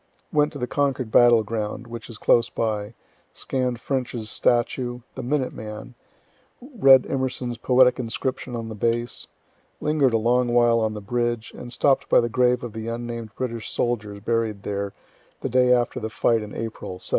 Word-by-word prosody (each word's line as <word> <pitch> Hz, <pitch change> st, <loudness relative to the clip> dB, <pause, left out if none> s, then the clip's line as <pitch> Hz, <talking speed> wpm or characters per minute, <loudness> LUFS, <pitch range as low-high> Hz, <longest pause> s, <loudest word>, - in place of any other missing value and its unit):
Went 150 Hz, 0 st, +3 dB
to -, -, -6 dB
the 125 Hz, -, -2 dB
Concord 130 Hz, -3 st, -1 dB
battle 120 Hz, -2 st, +6 dB
ground, 110 Hz, +1 st, -4 dB
which 115 Hz, 0 st, -8 dB
is 115 Hz, -, -8 dB
close 115 Hz, 0 st, +3 dB
by, 105 Hz, -1 st, -2 dB, 0.4 s
scann'd 125 Hz, -2 st, -2 dB
French's 120 Hz, -5 st, -3 dB
statue, 120 Hz, +1 st, 0 dB
"the 130 Hz, -, -6 dB
Minute 130 Hz, +1 st, -1 dB
Man," 110 Hz, +3 st, -8 dB, 0.7 s
read 185 Hz, -, +5 dB
Emerson's 125 Hz, -3 st, -3 dB
poetic 125 Hz, 0 st, +4 dB
inscription 125 Hz, +1 st, -3 dB
on 115 Hz, -1 st, -4 dB
the 110 Hz, -, -6 dB
base, 115 Hz, +2 st, -1 dB, 0.5 s
linger'd 150 Hz, -5 st, +2 dB
a -, -, +4 dB
long 120 Hz, +2 st, +2 dB
while 120 Hz, -1 st, +5 dB
on 110 Hz, -1 st, -1 dB
the 105 Hz, -, -6 dB
bridge, 120 Hz, +1 st, -2 dB
and 120 Hz, -, -9 dB
stopp'd 135 Hz, +2 st, +2 dB
by -, -, +6 dB
the 120 Hz, -, 0 dB
grave 125 Hz, +1 st, +2 dB
of 120 Hz, -3 st, -6 dB
the 110 Hz, 0 st, -6 dB
unnamed 115 Hz, -2 st, -5 dB
British 115 Hz, -4 st, -4 dB
soldiers 105 Hz, -4 st, -2 dB
buried 110 Hz, -2 st, -1 dB
there 100 Hz, -1 st, -3 dB, 0.5 s
the -, -, -2 dB
day 125 Hz, +1 st, +4 dB
after 120 Hz, 0 st, +2 dB
the 110 Hz, -1 st, -4 dB
fight 115 Hz, 0 st, +1 dB
in 105 Hz, -1 st, -8 dB
April, 110 Hz, -5 st, -5 dB
'75. -, -, -5 dB
120 Hz, 175 wpm, -24 LUFS, 110-125 Hz, 0.7 s, battle